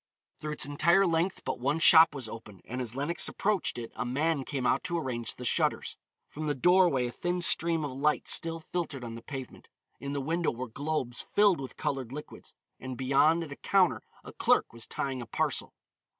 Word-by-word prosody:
Through 150 0 -4
its - - -1
entire 170 +7 +3
length 170 +2 0
but - - -3
one 140 +5 0
shop 160 -1 +8
was 130 -5 -5
open, 105 -4 -10
and 125 +2 -4
as 120 -1 -3
Lenox 145 +6 0
approached 205 -9 -1
it 115 -1 -6
a 110 - -2
man 140 +4 0
came 135 -2 -4
out 120 - +2
to 170 -2 -1
arrange 125 -7 -3
the 125 - -7
shutters. - - 0 0.3
From 155 +1 -6
the 145 - 0
doorway 175 -4 +4
a 120 - -3
thin 175 +6 -2
stream 165 -2 +2
of 145 - -4
light 150 +3 0
still 165 0 +1
filtered 155 -5 -4
on 115 -1 -6
the 115 - -8
pavement. 135 0 -8 0.3
In 140 0 -5
the 140 - -1
window 165 +5 0
were 125 +2 -5
globes 140 -1 -3
filled 205 -7 +3
with 130 - -8
colored 130 -4 -3
liquids, 150 +2 -9 0.2
and 130 -1 -6
beyond 140 +6 +3
at 155 - -9
a - - -6
counter 190 -3 +2 0.2
a - - -11
clerk - - +2
was 115 0 -8
tying 130 -1 -3
a 120 - -8
parcel. - - -1
145 Hz, 205 wpm, -29 LUFS, 125-165 Hz, 0.3 s, shop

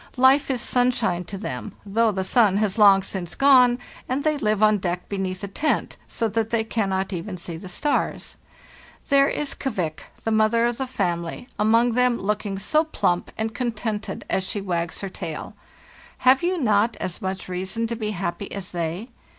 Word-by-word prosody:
Life 265 +3 +5
is 255 -3 0
sunshine 245 -9 +1
to 195 +3 -6
them, 205 0 -5
though 220 +3 +2
the 190 -2 -2
sun 205 -1 +4
has 210 0 0
long 195 -2 +7
since 185 -3 -4
gone, 255 -3 +6 0.3
and 265 +3 -1
they 310 -1 +2
live 215 -6 +1
on 215 -1 +5
deck 180 -1 -3
beneath 190 -1 -3
a - - -2
tent, 300 +10 -1
so 230 - -1
that 225 +1 -1
they 230 -1 +1
cannot 195 -3 -1
even 185 +2 -5
see 170 -1 -7
the 180 +3 -9
stars. 290 +11 -1 0.7
There 275 -1 +5
is 295 0 -1
'Kvik,' 180 - -3 0.2
the 225 - -1
mother 220 +2 +3
of 240 +1 -1
the 265 - -2
family, 170 -2 -2
among 230 +3 +4
them, 250 0 +3
looking 205 0 -2
so 305 +11 +2
plump 180 - 0
and 220 0 -2
contented 220 -5 -3
as 190 - 0
she 195 +2 -3
wags 175 -4 -2
her 195 - -4
tail. - - -6 0.7
Have 260 +1 +6
you 360 +1 0
not 220 -5 +2
as 180 - -4
much 190 0 -4
reason 190 +5 -2
to 235 +1 -2
be 220 -2 -3
happy 195 -1 -4
as 195 -2 -5
they? 175 +6 -3
215 Hz, 185 wpm, -24 LUFS, 190-240 Hz, 0.7 s, long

